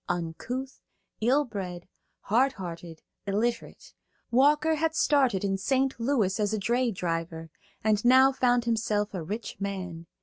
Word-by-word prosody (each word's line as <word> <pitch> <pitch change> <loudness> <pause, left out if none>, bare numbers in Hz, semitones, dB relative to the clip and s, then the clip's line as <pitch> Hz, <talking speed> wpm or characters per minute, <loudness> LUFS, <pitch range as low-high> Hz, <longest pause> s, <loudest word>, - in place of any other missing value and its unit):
Uncouth, 235 +11 -4 0.4
ill 270 +6 +3
bred, 185 -6 -6 0.3
hardhearted, 180 -9 -2 0.2
illiterate, 225 +4 -2 0.4
Walker 295 +5 +4
had 320 +1 0
started 265 -12 +2
in 195 -1 -1
St. 265 +3 0
Louis 230 -6 +1
as 210 +1 +1
a - - -2
dray 240 +5 +1
driver, 165 -4 -4 0.3
and 215 -1 +2
now 260 +2 +6
found 245 -2 +2
himself 215 -3 0
a 185 - -3
rich 205 +6 -6
man. 185 -4 -5
215 Hz, 130 wpm, -27 LUFS, 185-260 Hz, 0.4 s, now